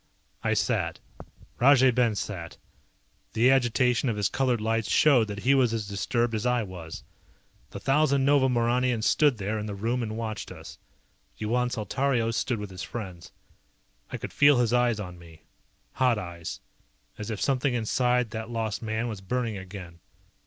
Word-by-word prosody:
I - - +1
sat. - - 0 0.6
Rajay 130 0 +6
Ben 120 -3 +2
sat. 90 -3 -5 0.8
The 120 +4 +4
agitation 125 0 +2
of 115 - -1
his 105 - +1
colored 130 -3 +1
lights 115 0 -1
showed 130 -8 +4
that 100 -1 -6
he 135 - +3
was 125 -4 +3
as 110 -3 -3
disturbed 115 +4 -1
as 110 -1 -2
I 125 -1 +1
was. 90 -5 -8 0.7
The - - -8
thousand 140 -1 +2
Nova 140 -2 +4
Mauranians 120 -1 +1
stood 145 -5 +3
there 105 +2 -2
in 105 - -5
the 100 - -5
room 115 +5 -1
and 110 -1 -4
watched 110 -2 -5
us. - - -11 0.6
Yuan 125 +3 0
Saltario 120 0 0
stood 120 +1 -1
with 105 -2 -7
his 90 -1 -8
friends. 95 -7 -7 0.8
I - - -3
could - - -7
feel 145 -1 +5
his 120 -1 +2
eyes 120 -3 +2
on 90 -3 -7
me. 80 -2 -16 0.5
Hot 125 -3 +2
eyes. 85 -4 -6 0.6
As 105 +1 -5
if 110 -3 -4
something 135 -1 +1
inside 125 +1 +1
that 110 +1 -5
lost 115 -3 -3
man 110 +1 -2
was 105 -4 -6
burning 115 +2 -2
again. 95 -3 -9
115 Hz, 165 wpm, -27 LUFS, 105-125 Hz, 0.8 s, Rajay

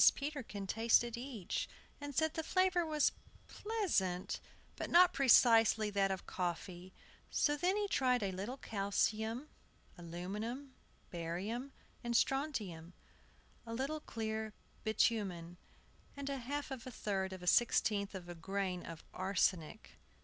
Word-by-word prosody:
Peterkin 275 -9 -4
tasted 230 +3 +3
each, 235 -6 -4 0.3
and 290 -1 -6
said 315 +1 +2
the 320 - -1
flavor 370 +1 +2
was 305 -2 +2 0.4
pleasant, 310 - -1 0.4
but - - -4
not 355 +1 +7
precisely 225 -4 +6
that 200 -1 +2
of 190 -1 -3
coffee. 180 0 -4 0.4
So 295 - +2
then 360 +7 +1
he 415 -1 0
tried 250 - +2
a 195 - 0
little 200 +8 -4
calcium, 220 +4 -1 0.5
aluminum, 210 +11 -5 0.4
barium, 190 +10 -3 0.3
and 235 -1 +2
strontium, 210 - -1 0.7
a 230 0 -5
little 275 +5 -2
clear 220 -4 -4 0.3
bitumen, 195 -6 0 0.6
and 280 0 -3
a 275 - -2
half 280 +3 -4
of 260 -2 -6
a - - -6
third 195 -4 -2
of 185 -1 -7
a - - -6
sixteenth 210 -2 +3
of 180 -2 -7
a 175 - -6
grain 185 +1 -2
of 165 -1 -8
arsenic. 185 0 -1
220 Hz, 130 wpm, -36 LUFS, 190-275 Hz, 0.7 s, not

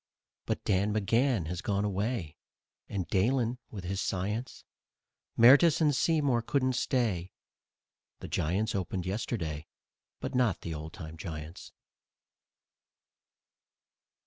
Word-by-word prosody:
But - - -2
Dan 100 +1 +2
McGann 115 - +2
has 90 +3 -4
gone 100 0 0
away 100 -4 -2 0.5
And 95 -4 -3
Dahlen 120 +4 +1
with 100 -4 -7
his 95 +2 -2
science; 105 +7 -3 0.7
Mertes 140 +7 +7
and 150 -3 +3
Seymour 145 -6 +2
couldn't 130 +2 +1
stay 115 -8 0 0.9
The - - -7
Giants 95 +8 0
opened 95 -1 -2
yesterday 90 -6 -3 0.5
But - - -4
not 125 -7 +2
the 85 - -4
old 80 +1 -7
time 80 0 -8
Giants. 80 -1 -7
100 Hz, 110 wpm, -30 LUFS, 90-125 Hz, 0.9 s, Mertes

